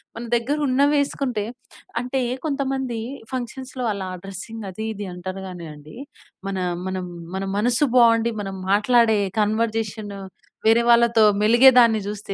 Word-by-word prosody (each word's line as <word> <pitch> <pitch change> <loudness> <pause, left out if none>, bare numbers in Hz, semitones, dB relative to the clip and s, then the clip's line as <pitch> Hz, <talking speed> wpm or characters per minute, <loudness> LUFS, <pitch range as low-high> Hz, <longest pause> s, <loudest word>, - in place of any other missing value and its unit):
మన 230 - -6
దగ్గరున్నవేసుకుంటే, 280 -2 +1 0.6
అంటే 255 +2 -2 0.2
కొంతమంది 270 -4 -2 0.3
ఫంక్షన్స్‌లో 255 0 -5
అలా 195 -2 -5 0.2
డ్రెస్సింగ్ 205 +3 -8
అదీ 220 +4 -6
ఇది 205 -2 -6
అంటారు 185 +2 -6
గానీ 175 -2 -8
అండి, 150 +6 -14 0.5
మన 195 -1 -3 0.3
మనం 185 -1 -3 0.3
మన 190 - -2
మనసు 245 +6 +2
బాగుండి, 230 -1 +5
మనం 195 -1 -5 0.2
మాట్లాడే 220 0 +4 0.2
కన్వర్జేషను, 215 -1 -1 0.5
వేరే 225 +1 +5
వాళ్ళతో 235 -1 +5 0.2
మెలిగే 240 +5 +7
దాన్ని 225 -3 +4
జూస్తే, 205 -1 -5
225 Hz, 120 wpm, -22 LUFS, 205-250 Hz, 0.6 s, మెలిగే